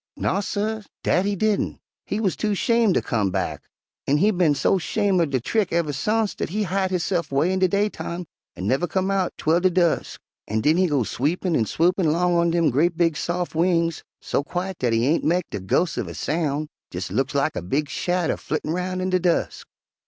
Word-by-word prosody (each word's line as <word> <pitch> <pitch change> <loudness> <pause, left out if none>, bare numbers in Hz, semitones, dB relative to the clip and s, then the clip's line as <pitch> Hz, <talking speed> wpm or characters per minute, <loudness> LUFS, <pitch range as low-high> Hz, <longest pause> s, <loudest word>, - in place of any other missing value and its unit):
"Naw, 195 - 0
suh, 215 +2 -2 0.2
dat 185 - +2
he 205 - 0
didn'. 215 +1 0 0.3
He 205 - -2
wuz 200 -4 +1
too 210 -2 -1
'shame' 230 0 +3
ter - - +2
come 110 -6 0
back, - - -2 0.5
an' 145 - +3
he 205 +7 +4
bin 175 -6 +2
so 190 - +2
'shame' 195 0 +1
er 165 - +2
de 135 -2 0
trick 200 - 0
uver 165 -3 0
sence 215 +9 0
dat - - -4
he 210 +5 -1
hide 190 0 0
hisse'f 175 -3 -1
way 150 +7 +2
in 190 - 0
de 185 - +4
daytime 190 -2 -2 0.3
an' 95 - -5
nuver 135 - +1
come 190 +1 0
out 190 -2 +1
'twel 160 +2 +2
de 185 +1 +3
dusk, 175 -2 0 0.3
an' 110 +1 -1
den 155 +7 +3
he 185 0 +3
go 145 -6 +1
sweepin' 160 - -1
an' 115 - +2
swoopin' 170 - +2
'long 175 +2 +2
on 170 0 +3
dem 170 -3 +2
gre't 165 +6 +2
big 165 -2 +2
sof' 175 +3 -2
wings, 165 0 +1 0.2
so - - -1
quiet 180 +3 -4
dat 125 -2 +1
he 115 +1 +2
ain' 155 +5 +2
mek 175 +3 +1
de 105 - -3
ghos' 160 - 0
uv - - -2
a - - -7
soun', 155 -1 -1 0.2
jes' 90 +1 -5
looks 135 +7 -1
lak 140 +2 +1
a - - -2
big 140 - -1
shadder 175 +3 -1
flittin' 155 0 -3
roun' 185 +1 -2
in 185 0 -1
de 185 - +3
dusk. 175 -1 -1
175 Hz, 220 wpm, -23 LUFS, 150-185 Hz, 0.5 s, he